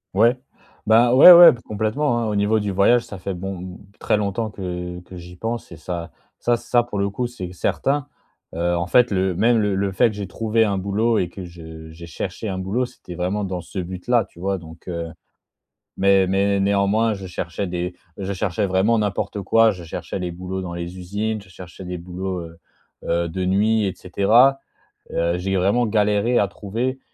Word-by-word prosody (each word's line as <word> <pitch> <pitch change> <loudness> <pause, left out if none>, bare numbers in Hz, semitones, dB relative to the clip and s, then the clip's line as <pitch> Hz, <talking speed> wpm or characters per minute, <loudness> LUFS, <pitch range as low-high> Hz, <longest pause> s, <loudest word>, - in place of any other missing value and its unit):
Ouais, 115 +5 +4 0.5
ben 115 +2 +5
ouais, 145 +8 +11
ouais 175 0 +10
p 120 - -7
complètement, 110 +5 0
hein, 115 - -1
au 105 - -2
niveau 105 +2 +2
du 105 -1 -2
voyage, 100 +6 +4
ça 100 - -9
fait 95 +2 -4
bon, 90 0 -7 0.2
très - - +1
longtemps 105 +2 -2
que 90 -3 -6
que 90 +1 -12
j'y 90 0 -11
pense 115 0 -5
et - - -9
ça 85 +2 -6 0.3
ça 120 - +2
ça 120 +1 +1
pour 110 -4 -5
le 100 0 +1
coup 120 +5 -3
c'est 95 -8 -7
certain. 140 +10 -1 0.5
Heu, 85 +1 0
en 85 +1 -2
fait, 125 +6 +4
le 95 -2 0
même 115 +6 +3
le 105 -2 +1
le 100 0 0
fait 95 - +3
que 110 - -8
j'ai 100 -2 -5
trouvé 115 +3 +1
un 100 -3 0
boulot 105 +4 +1
et 90 - +1
que 95 +2 -9
je 80 -2 -11
j'ai 85 +1 -11
cherché 90 +6 -5
un 95 -2 -3
boulot 100 +7 -1
c'était 90 -7 -11
vraiment 90 +4 -2
dans 95 -2 -3
ce 90 - -10
but-là, 95 +7 0
tu 95 -3 -18
vois, 95 +2 -1
donc, 80 -1 -13
heu 85 -2 -4 0.9
Mais 95 -1 +3
mais 100 +1 +1
néanmoins 100 +3 +2
je 95 -1 -8
cherchais 90 +2 -4
des 90 0 -4 0.2
je 100 0 -4
cherchais 100 +1 -1
vraiment 100 +5 +2
n'importe 100 0 -2
quoi. 115 +3 +4
Je 90 -3 -10
cherchais 85 +3 -6
les 90 -1 -3
boulots 90 +2 -5
dans 85 -2 -6
les 85 +1 -6
usines, 105 +4 -3
je 95 - -19
cherchais 90 0 -11
des 90 0 -5
boulots, 90 +2 -5
heu, 85 0 -10 0.5
heu, 85 0 0
de 90 +3 -3
nuit, 105 +4 +2
et 95 -2 -2
cetera. 115 +10 +3 0.5
Heu, 85 +1 0
j'ai 95 +2 -1
vraiment 100 +6 +2
galéré 105 +2 +2
à 100 - +3
trouver 115 +7 -4
95 Hz, 205 wpm, -22 LUFS, 90-110 Hz, 0.9 s, ouais